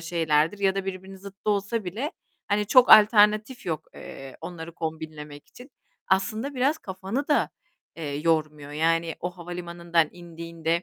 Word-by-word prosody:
şeylerdir 165 +1 +1
ya 195 -1 +2
da 195 -1 -2
birbirinin 190 0 -6
zıttı 200 +2 -5
olsa 205 +2 -1
bile, 235 - -4 0.4
hani, 210 0 +1
çok 250 +4 +6
alternatif 215 +2 +6
yok, 160 -3 -2
eee, 135 -1 -10
onları 170 -1 -7
kombinlemek 155 -3 -6
için. 255 +3 -14 0.4
Aslında 215 +9 0
biraz 275 +5 +1
kafanı 195 +8 -4
da, 290 - +2 0.5
eee, 165 - -6
yormuyor. 155 -2 0
Yani 165 +1 +1
o 175 - -2
havalimanından 170 -2 -1
indiğinde 170 -1 -3
175 Hz, 140 wpm, -26 LUFS, 165-205 Hz, 0.5 s, çok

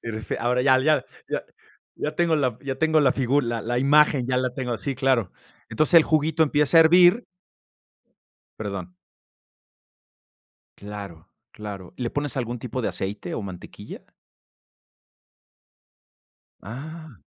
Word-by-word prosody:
este, 110 -2 -5
ahora 125 +2 0
ya 130 -1 +5
ya 150 -1 +2 0.2
ya - - -2 0.5
ya 150 - -3
tengo 170 -2 +2
la 130 -6 -1
ya 135 -1 -4
tengo 160 +2 +2
la 135 -3 +4
figu 135 +2 +1
la 120 -3 -3
la 120 +2 -1
imagen, 140 -1 +4
ya 125 0 0
la 130 0 0
tengo. 125 -3 -3
Sí, 135 +7 -3
claro. 125 -6 +1 0.4
Entonces, 155 +9 0
el 165 - +9
juguito 160 +1 +1
empieza 150 +1 +2
a - - +10
hervir 175 +7 +6 1.4
Perdón. 100 -4 -5 1.9
Claro, 100 -5 -9 0.2
claro, 100 -4 -9
¿le 125 -2 -3
pones 145 +2 -4
algún 120 -2 -3
tipo 125 +1 -4
de 115 - -2
aceite 95 -2 -5
o - - -4
mantequilla? 95 -3 -10 2.6
¡Ah! 150 - -9
130 Hz, 130 wpm, -24 LUFS, 110-150 Hz, 2.6 s, a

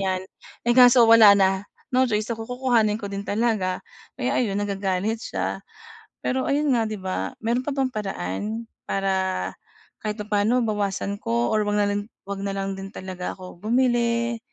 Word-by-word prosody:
'yan." 190 -1 0 0.5
Eh, 240 - +4
kaso 245 -1 +8
wala 225 -2 +9
na. 190 0 +2 0.3
No 260 +1 +5
choice 215 0 -1
ako, 225 0 -5
kukukuhanin 240 -4 +2
ko 205 - -5
din 200 0 -4
talaga. 205 -4 0 0.4
Kaya - - 0
ayun, 205 -5 0
nagagalit 200 +2 -1
siya. - - -3 0.6
Pero 260 +1 0
ayun 285 -1 +2
nga, 230 - +2
'di 215 -1 -4
ba? 185 +6 -3
Meron 240 +3 +1
pa 290 - -1
bang 270 -2 +1
paraan 210 - -4 0.2
para 190 - 0 0.5
kahit 215 +1 -3
papa'no 210 +4 +1
bawasan 200 -1 -1
ko 120 - 0
or 215 0 +2
'wag 205 0 +1
na 205 - +3
lang 205 0 -2 0.2
'wag 200 0 -4
na 200 -1 -2
lang 195 0 -2
din 195 0 -7
talaga 185 -1 -5
ako 185 -2 -11
bumili? 235 +1 +1
210 Hz, 170 wpm, -24 LUFS, 195-235 Hz, 0.6 s, wala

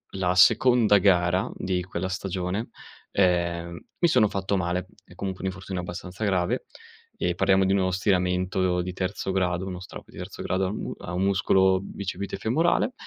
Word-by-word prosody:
la 90 -2 +1
seconda 115 +2 +5
gara 95 +2 +2
di 90 -1 -2
quella 95 0 -4
stagione, 95 +2 -3 0.4
ehm, 85 -2 0 0.2
mi 175 - +4
sono 110 -9 +4
fatto 95 0 -1
male. 90 0 -1 0.2
È - - -16
comunque 95 0 -5
un 95 - 0
infortunio 95 -1 -5
abbastanza 90 +3 -7
grave, 90 -4 0 0.5
ehm, 90 0 -1
parliamo 95 +1 +3
di 95 0 +2
uno 95 -1 +2
stiramento 90 -1 +1
di 90 +1 -4
terzo 95 +1 -3
grado, 90 -1 0
uno 90 -1 -5
strap 95 - -10
di - - -15
terzo - - -7
grado 95 +1 0
a 95 - -1
un 105 - -4
mu - - -4
a 85 - -7
un 90 - -1
muscolo 95 -1 +3
bicipite 100 0 -5
femorale, 165 - +1
95 Hz, 175 wpm, -26 LUFS, 90-100 Hz, 0.5 s, seconda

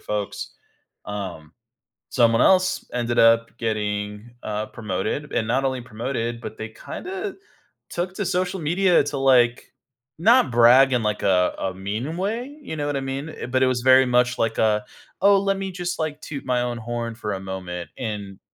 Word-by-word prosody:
folks, 105 -1 -4 0.5
um, 95 -7 -6 0.6
someone 115 -1 +3
else 185 0 +4
ended 120 -1 -1
up 115 0 +4
getting, 105 0 -3
uh, 105 0 -2
promoted, 110 +7 -3
and 110 - 0
not 130 +4 +1
only 130 -1 -1
promoted, 120 0 -4
but 110 - -7
they 110 - -5
kinda 385 - -6 0.5
took 180 +2 -3
to 205 - -2
social 180 +1 -1
media 175 +2 +3
to, 145 -1 -3
like, 125 -3 +3 0.5
not 225 - +4
brag 120 +3 +6
in, 120 -3 +1
like, 105 0 -1
a 90 -2 +3
a 95 - -2
mean 105 - -4
way, 225 +7 -2
you 160 - -6
know 145 -1 -2
what 145 -1 -1
I - - -2
mean? 135 +3 -4
Uh, - - -7
but 130 +1 +1
it 130 - +4
was 125 -2 0
very 130 +1 +6
much, 125 0 +2
like, 115 0 0
a, 105 -1 +2 0.4
"Oh, 200 +1 +6
let 195 0 0
me 195 0 -4
just, 180 -1 -4
like, 155 -1 -2
toot 145 -3 -6
my 125 -1 +1
own 120 -1 -3
horn 115 0 -4
for 105 -3 -4
a 95 - -4
moment." 95 -2 -6
and 105 -5 -5
120 Hz, 180 wpm, -23 LUFS, 110-150 Hz, 0.6 s, brag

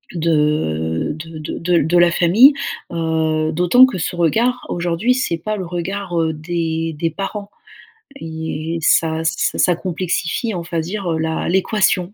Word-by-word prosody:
de 150 - 0
de 160 +1 -9
de 155 - -6
de 175 +1 -1
l 170 - +3
de 175 +2 +3
la 175 0 +5
famille. 200 - +6 0.4
Heu, 160 -1 0
d'autant 180 +10 +5
que 260 -7 -3
ce 175 - -3
regard, 230 +10 +1
aujourd'hui, 175 +7 0
c'est 250 -10 -1
pas 215 +6 -4
le 190 - -4
regard, 180 +1 -4
heu, 160 -1 0
des 165 0 -3
des 165 +2 0
parents 200 +4 -5 0.7
et 160 0 -4
ça 160 +1 +2
ç - - +1 0.3
ça 175 - +3
complexifie, 180 +3 -2
on 175 - -4
va 165 -1 -2
dire 190 +4 -5
heu 160 - -1
la 160 0 -2
l'équation. 190 -1 +1
170 Hz, 165 wpm, -19 LUFS, 160-185 Hz, 0.7 s, famille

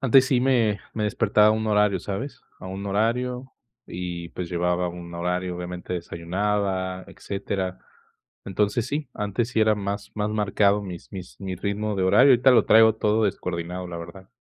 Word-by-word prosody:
antes 135 0 +6
sí 130 -2 +2
me 120 -6 +2
me 105 - -1
despertaba 105 0 +3
a - - +5
un 110 0 0
horario, 105 -3 +2
¿sabes?, 110 +10 -5 0.2
a - - -9
un 95 +2 -6
horario 125 +5 -1 0.3
y, 85 -1 -5
pues, 90 -2 -5
llevaba 90 +1 0
un 85 0 -8
horario, 90 +1 -2
obviamente, 90 0 -6
desayunaba, 95 +2 -2
etcétera, 95 -2 -4 0.7
entonces, 105 +4 0
sí, 145 -2 -3
antes 105 +3 -2
sí 115 - +1
era 110 0 +4
más 100 0 -4
más 105 0 -1
marcado 105 -1 +2
mis 90 -2 -9
mis 95 -2 -9
mi 95 -1 -4
ritmo 100 +2 -2
de 95 - 0
horario, 135 +9 +6
ahorita 125 +2 +5
lo 120 - +5
traigo 110 0 +7
todo 110 0 +1
descoordinado, 90 -2 -3
la 85 -1 -6
verdad. 85 +3 -10
100 Hz, 170 wpm, -24 LUFS, 90-110 Hz, 0.7 s, traigo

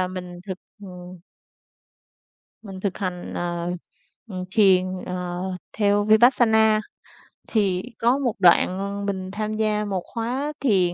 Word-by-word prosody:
À, 185 - 0
mình 180 -1 -7
thực, 185 -1 -5 0.2
ừm 180 -1 -10 1.4
mình 195 -4 -9
thực 190 -1 -2
hành, 180 -3 -4
ờ, 175 0 -2 0.6
ừm 185 -2 -4
thiền, 190 -3 +5 0.2
ờ, 180 -1 -4 0.4
theo 205 -1 +3
Vipassana. 220 -1 +5 0.7
Thì 195 -4 +1 0.2
có 240 +3 +3
một 255 -6 0
đoạn 195 +2 +3
mình, 190 -2 -2
ờ, 185 - -7
tham 215 0 -2
gia 215 -1 0
một 190 -3 -2
khóa 255 +6 -3
thiền 190 -9 +2
200 Hz, 130 wpm, -24 LUFS, 180-215 Hz, 1.4 s, thiền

